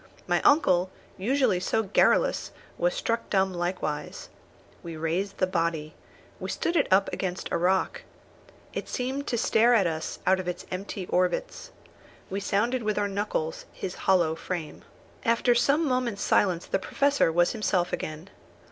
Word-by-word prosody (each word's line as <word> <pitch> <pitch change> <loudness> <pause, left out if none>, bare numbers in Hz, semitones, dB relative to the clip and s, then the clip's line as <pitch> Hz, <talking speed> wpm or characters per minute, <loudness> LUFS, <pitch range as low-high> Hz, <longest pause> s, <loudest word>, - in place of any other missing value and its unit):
My - - +1
uncle, 185 - +4 0.3
usually 245 -2 +1
so 220 +4 0
garrulous, 200 0 +2 0.3
was - - 0
struck 230 - -2
dumb 190 -1 +2
likewise. 175 -4 -3 0.5
We 165 -2 -7
raised 175 +5 -2
the 185 - +3
body. 165 -4 -1 0.5
We - - -5
stood 340 - -1
it 295 - +3
up 195 +1 +5
against 185 -1 -3
a - - +1
rock. 185 +2 +1 0.7
It - - -5
seemed 265 +3 -3
to 240 - 0
stare 235 +1 +4
at 200 -5 +4
us 160 -2 -3
out 190 +1 +4
of 185 - -5
its 180 0 -4
empty 190 0 -4
orbits. 185 - -1 0.6
We 195 - -1
sounded 220 +5 0
with 215 -1 -1
our 205 -1 +1
knuckles 195 -5 -3
his 185 - -5 0.2
hollow 175 -4 +4
frame. 165 -1 -5 0.4
After 235 +1 +3
some 285 +6 +2
moments' 250 -5 -1
silence 180 -4 +2
the - - -1
Professor 280 -2 +2
was 175 +1 +3
himself 190 -5 0
again. 155 +4 -5
190 Hz, 155 wpm, -27 LUFS, 175-235 Hz, 0.7 s, up